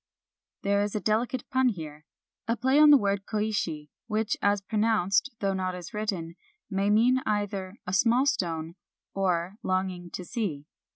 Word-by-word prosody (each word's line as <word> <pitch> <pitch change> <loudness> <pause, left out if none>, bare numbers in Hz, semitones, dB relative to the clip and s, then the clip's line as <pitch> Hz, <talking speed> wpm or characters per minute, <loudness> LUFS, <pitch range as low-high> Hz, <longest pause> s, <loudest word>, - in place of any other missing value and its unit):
There 200 0 +2
is 205 0 -2
a - - +1
delicate 240 +5 -1
pun 260 -1 +3
here, 155 -6 -7 0.2
— - - -60
a 230 +1 0
play 260 +5 +3
on 305 0 +8
the 290 - +9
word 200 -3 -1
Koishi, 200 -9 -2 0.2
which, 215 -1 0
as 205 0 +3
pronounced, 210 +1 +1
though 195 -1 +1
not 185 -1 -2
as 180 +4 -9
written, 185 -6 -3 0.3
may 195 +1 +1
mean 235 +5 +4
either 205 -2 -2
" - - -62
a 180 - -4
small 235 +6 +4
stone," 165 - -1 0.4
or 185 0 0
" - - -61
longing 185 -2 -2
to 180 - -5
see." 175 - -3
200 Hz, 175 wpm, -27 LUFS, 180-220 Hz, 0.4 s, the